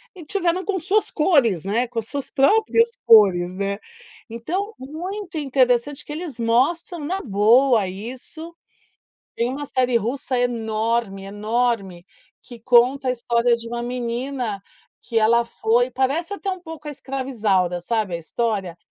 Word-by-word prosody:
e 350 Hz, -, -10 dB
tiveram 360 Hz, +1 st, 0 dB
com 385 Hz, -1 st, -1 dB
suas 405 Hz, +6 st, +1 dB
cores, 270 Hz, -, +2 dB
né, 230 Hz, +5 st, 0 dB
com 235 Hz, 0 st, -11 dB
as 225 Hz, -1 st, -2 dB
suas 280 Hz, -2 st, -5 dB
próprias 445 Hz, -, +3 dB, 0.2 s
cores, 185 Hz, -5 st, +6 dB
né, 200 Hz, +1 st, -2 dB, 0.5 s
então 350 Hz, -, -3 dB
muito 350 Hz, +7 st, -7 dB
interessante 265 Hz, 0 st, +1 dB
que -, -, -9 dB
eles 310 Hz, -3 st, -5 dB
mostram 280 Hz, +10 st, +1 dB
na 375 Hz, +5 st, -2 dB
boa 225 Hz, +1 st, +4 dB
isso. 255 Hz, -, -8 dB, 0.9 s
Tem 235 Hz, -, +2 dB
uma 285 Hz, +3 st, -4 dB
série 255 Hz, -2 st, +1 dB
russa 255 Hz, +3 st, -2 dB
enorme, 225 Hz, -3 st, -1 dB
enorme, 205 Hz, -3 st, -1 dB, 0.4 s
que 240 Hz, -, -12 dB
conta 250 Hz, +3 st, +3 dB
a -, -, +3 dB
história 235 Hz, 0 st, +1 dB
de 230 Hz, 0 st, -8 dB
uma 240 Hz, 0 st, -4 dB
menina, 245 Hz, -2 st, -3 dB, 0.4 s
que 235 Hz, -, -7 dB
ela 230 Hz, +2 st, +4 dB
foi 240 Hz, +2 st, +1 dB
parece 305 Hz, +9 st, 0 dB
até 400 Hz, -1 st, -4 dB
um 375 Hz, -, -4 dB
pouco 320 Hz, -3 st, -9 dB
a -, -, -3 dB
escrava 270 Hz, -1 st, -5 dB
Isaura 190 Hz, -7 st, +1 dB
sabe, 215 Hz, -1 st, -1 dB
a -, -, -2 dB
história, 195 Hz, 0 st, -2 dB
245 Hz, 150 wpm, -22 LUFS, 220-295 Hz, 0.9 s, cores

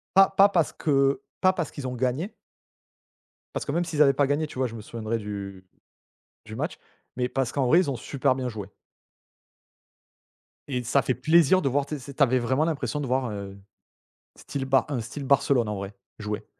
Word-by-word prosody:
Pas 195 Hz, 0 st, +7 dB
pas 195 Hz, +1 st, +5 dB
parce 170 Hz, -5 st, +1 dB
que 140 Hz, +4 st, +2 dB, 0.2 s
pas 185 Hz, -1 st, +5 dB
parce 170 Hz, -6 st, -3 dB
qu'ils 130 Hz, -3 st, -6 dB
ont 125 Hz, -, -4 dB
gagné. 130 Hz, -, -1 dB, 1.2 s
Parce -, -, -3 dB
que 140 Hz, -, -2 dB
même 170 Hz, +3 st, 0 dB
s'ils 155 Hz, -3 st, 0 dB
avaient 140 Hz, -2 st, +6 dB
pas 140 Hz, 0 st, +2 dB
gagné, 150 Hz, +2 st, 0 dB
tu 130 Hz, -, -11 dB
vois, 130 Hz, -, +2 dB
je 115 Hz, -, -9 dB
me 110 Hz, -, -7 dB
souviendrai 115 Hz, +1 st, -3 dB
du 100 Hz, -2 st, -6 dB, 0.8 s
du -, -, -8 dB
match, -, -, -4 dB, 0.4 s
mais 125 Hz, -1 st, 0 dB
parce 135 Hz, -3 st, -1 dB
qu'en 135 Hz, -3 st, 0 dB
vrai 165 Hz, +8 st, +6 dB
ils 180 Hz, -6 st, +1 dB
ont 130 Hz, -, -3 dB
super 130 Hz, +2 st, 0 dB
bien 130 Hz, -1 st, -3 dB
joué. 105 Hz, -3 st, -6 dB, 2.0 s
Et 125 Hz, -3 st, -2 dB
ça 135 Hz, +4 st, +2 dB
fait 130 Hz, +1 st, 0 dB
plaisir 160 Hz, +7 st, +4 dB
de -, -, 0 dB
voir, 140 Hz, +2 st, +1 dB
tu 150 Hz, -1 st, -5 dB
sais 140 Hz, +2 st, -10 dB
tu 140 Hz, -, +3 dB
avais 130 Hz, 0 st, +3 dB
vraiment 130 Hz, +5 st, +1 dB
l'impression 150 Hz, -2 st, -2 dB
de 140 Hz, -, -3 dB
voir, 130 Hz, 0 st, 0 dB
heu, 100 Hz, -1 st, -7 dB, 0.8 s
style 140 Hz, -2 st, -5 dB
ba 135 Hz, 0 st, +2 dB
un 140 Hz, -4 st, -2 dB
style 120 Hz, +5 st, -6 dB
Barcelone 135 Hz, -3 st, +3 dB
en 105 Hz, -, -2 dB
vrai 100 Hz, +1 st, -6 dB, 0.2 s
jouer. 105 Hz, 0 st, -4 dB
135 Hz, 205 wpm, -26 LUFS, 120-150 Hz, 2.0 s, Pas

